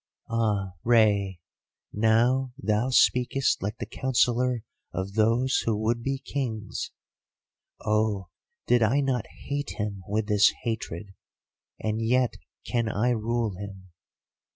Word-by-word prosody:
"'Ah, 105 -4 0
Rei, 105 -5 +3 0.5
now 120 +4 +3
thou 110 -2 0
speakest 130 +1 +3
like 105 +3 -3
the - - -4
counsellor 125 -2 +1 0.3
of 95 +1 -4
those 115 +5 +3
who 115 - +1
would 115 +2 0
be 135 +3 -1
kings. 120 -6 -4 1.0
Oh, 105 -4 +1 0.4
did 120 0 +4
I 120 +6 +3
not 130 -5 0
hate 145 0 -5
him 105 -2 -3
with 105 +1 0
this 105 -1 +5
hatred! 100 -4 -4 0.7
And 110 +1 -1
yet 125 +2 +2 0.3
can 115 -2 0
I 110 +4 +1
rule 115 -2 -1
him. 95 -2 -9
115 Hz, 120 wpm, -27 LUFS, 105-125 Hz, 1.0 s, this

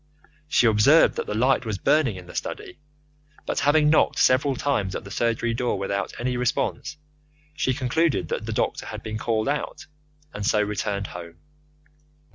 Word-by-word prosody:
She 140 - +3
observed 115 +9 +5
that - - -3
the 105 - -3
light 130 +4 +2
was 110 -4 -3
burning 135 +1 +2
in 90 -1 -10
the 90 - -12
study, - - -6 0.7
but - - -1
having 150 +1 +4
knocked 160 - +3
several 135 +2 +3
times 105 -9 -1
at - - -5
the 100 - -11
surgery 115 +1 0
door 120 +1 -1
without 100 0 -2
response, 125 +5 -2 0.6
she 130 -4 0
concluded 135 - 0
that - - -3
the - - -2
doctor - - -2
had - - -7
been 110 0 -5
called 110 0 -1
out, 145 +1 -3 0.5
and 100 - -5
so 105 +1 +2
returned 105 -1 -2
home. 85 -2 -9
115 Hz, 165 wpm, -24 LUFS, 105-135 Hz, 0.7 s, observed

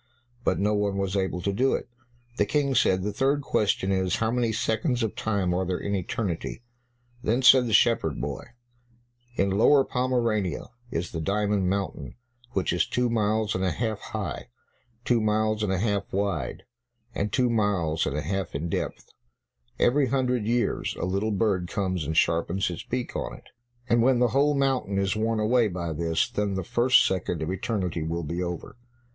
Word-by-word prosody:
But - - +1
no 105 +2 +1
one 105 -1 0
was 95 0 -1
able 95 -2 -1
to 100 - 0
do 130 +6 +2
it. - - -5 0.5
The 105 - +3
King 140 +3 +1
said, 95 -7 +3
"The 105 +1 -2
third 140 +2 +1
question 100 -5 +1
is, 95 -2 +1
how 110 0 0
many 120 -2 +1
seconds 115 +3 0
of 110 - -2
time 100 -5 0
are 90 +1 0
there 90 0 -1
in 100 - -3
eternity." 95 +2 -3 0.6
Then 120 +2 0
said 130 -1 +7
the - - -3
shepherd 100 - +3
boy, - - -4 0.9
"In 100 -3 +1
Lower 135 +8 +5
Pomerania 120 -8 -1 0.2
is 85 -3 -3
the 80 - -4
Diamond 100 +1 0
Mountain, 95 -9 -3 0.4
which 95 - 0
is 90 - +1
two 125 -1 0
miles 110 -1 +1
and 95 - -1
a 95 - +2
half 110 +4 -2
high, - - -5 0.6
two 120 -2 +3
miles 110 0 +1
and 105 -3 0
a 95 - +1
half 100 0 -1
wide, 100 +1 -2 0.5
and 105 +1 -2
two 125 -2 +2
miles 95 -8 +1
and 75 - -2
a 75 - -2
half 95 -5 -3
in 80 +4 -3
depth; - - -3 0.7
every 135 +2 +3
hundred 125 -3 0
years 120 -2 0
a - - -1
little 100 +4 -1
bird 100 -4 0
comes 95 -4 -2
and 80 0 -2
sharpens 85 +3 +1
its 85 - -5
beak 125 0 -4
on - - -3
it, - - -19 0.4
and 120 -1 +3
when 130 +1 +4
the 120 0 +3
whole 145 +4 +2
mountain 135 -8 0
is 100 +1 +1
worn 110 +1 0
away 115 +2 +3
by 85 -4 -4
this, 80 +1 0
then 100 -1 -2
the 95 - -2
first 125 +8 +4
second 90 -3 -1
of 80 - -2
eternity 95 -4 -2
will 85 +2 -2
be 85 +4 -3
over." 90 +4 -5
100 Hz, 185 wpm, -26 LUFS, 95-115 Hz, 0.9 s, said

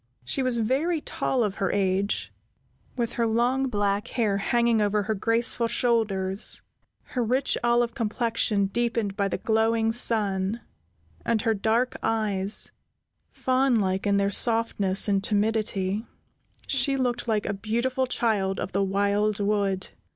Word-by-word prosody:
She 200 - 0
was 255 -2 +2
very 275 +9 0
tall 260 -4 -1
of 200 -3 -2
her 195 - 0
age, 195 0 0 0.6
with 235 -2 -1
her 230 -1 0
long 245 +4 +1
black 205 -3 -1
hair 215 -5 0
hanging 235 +1 +2
over 210 0 +1
her 220 - -1
graceful 230 +3 +1
shoulders, 215 -5 +1 0.4
her 250 - -3
rich 255 +4 +1
olive 240 0 +2
complexion 225 -2 0
deepened 230 -1 -1
by 200 -1 0
the - - -2
glowing 225 0 +1
sun, 215 -2 0 0.6
and 220 -3 0
her 225 - +2
dark 225 +4 0
eyes, 210 -3 0 0.6
fawn 260 0 +1
like 190 0 -1
in 200 0 +3
their 200 0 +1
softness 215 -4 +1
and 195 -1 +1
timidity, 210 -1 -1 0.6
she 275 0 +2
looked 245 -2 -1
like 215 -2 0
a 200 - -1
beautiful 235 +6 -1
child 205 -6 0
of - - -4
the 195 - 0
wild 200 +2 +1
wood. 200 -2 0
220 Hz, 140 wpm, -26 LUFS, 200-235 Hz, 0.6 s, in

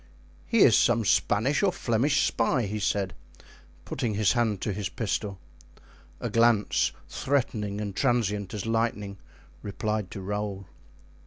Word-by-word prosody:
"He 230 -3 +3
is 115 - +6
some 115 -2 +3
Spanish 110 +9 +2
or 200 -2 +3
Flemish 135 +1 +1
spy," 120 +1 +1
said 100 -2 -1 0.2
he, - - -21 0.4
putting 120 -6 -2
his 105 -1 +3
hand 115 -5 +1
to 105 - -1
his 100 0 -3
pistol. 105 -2 -3 0.8
A - - -3
glance, 115 -2 +3 0.2
threatening 110 -7 -1
and 100 -2 -4
transient 105 -7 0
as 105 - -4
lightning, 115 -3 -1 0.4
replied 105 -1 -3
to 100 - -7
Raoul. 100 0 -4
105 Hz, 135 wpm, -27 LUFS, 100-120 Hz, 0.8 s, is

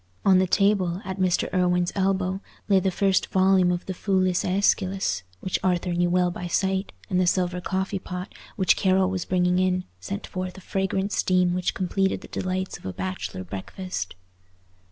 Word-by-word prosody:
On 190 -2 +6
the 185 - +2
table, 190 -2 +2
at 190 +1 -5
Mr. 185 -2 +2
Irwine's 180 -1 +2
elbow, 190 -1 0 0.3
lay 195 -2 +5
the 190 +1 +1
first 195 0 +2
volume 185 -1 +4
of 175 0 -2
the 190 - -3
Foulis 185 -1 +1
Æschylus, 190 - +1 0.2
which 185 - -1
Arthur 180 -1 +1
knew 175 0 +2
well 180 0 +2
by 180 0 -5
sight; 190 +2 0 0.2
and 185 -2 +1
the 180 - +2
silver 180 0 +1
coffee 190 +1 -2
pot, 180 0 -6 0.2
which 190 - +3
Carroll 190 0 +2
was 185 -2 -2
bringing 180 0 +2
in, 185 0 +1 0.2
sent 95 +2 -5
forth 185 0 -5
a - - -10
fragrant 195 +1 -1
steam 180 -2 +2
which 180 0 -1
completed 190 +1 0
the - - -11
delights 185 0 -3
of - - -16
a 95 - -4
bachelor 95 0 -4
breakfast. 100 - -5
185 Hz, 175 wpm, -25 LUFS, 180-190 Hz, 0.3 s, On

